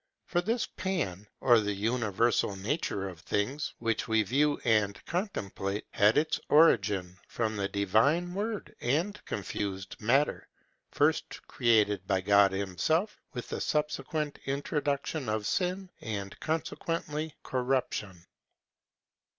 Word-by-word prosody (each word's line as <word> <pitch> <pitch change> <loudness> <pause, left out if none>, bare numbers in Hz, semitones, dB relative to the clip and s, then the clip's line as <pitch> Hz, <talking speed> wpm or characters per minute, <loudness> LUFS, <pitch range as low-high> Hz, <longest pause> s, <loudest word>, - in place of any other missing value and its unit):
For 175 - +1
this 225 +6 0
Pan, 105 - -3
or 120 -3 +6
the 105 -1 -1
universal 110 -1 +1
nature 100 - -2
of 90 -4 -9
things, 130 - -2
which 115 0 -1
we 110 -1 +3
view 145 +7 +2
and 105 -3 +2
contemplate, 105 - -3
had 105 +2 +4
its 155 +1 +2
origin 100 - +4
from 110 -2 -2
the 100 -1 -1
divine 110 - +2
word 210 +2 -3
and 165 +12 0
confused 95 -1 -4
matter, 135 +7 +2 0.4
first - - 0
created 105 -5 +2
by 95 -2 +2
God 100 0 +5
himself, 100 - 0
with 125 - -6
the - - -3
subsequent 150 0 -1
introduction 140 -1 -1
of 110 -1 -1
sin, 185 - -1
and, 100 -3 -4
consequently, 160 -1 -3
corruption. 125 -8 -2
115 Hz, 120 wpm, -30 LUFS, 100-150 Hz, 0.4 s, or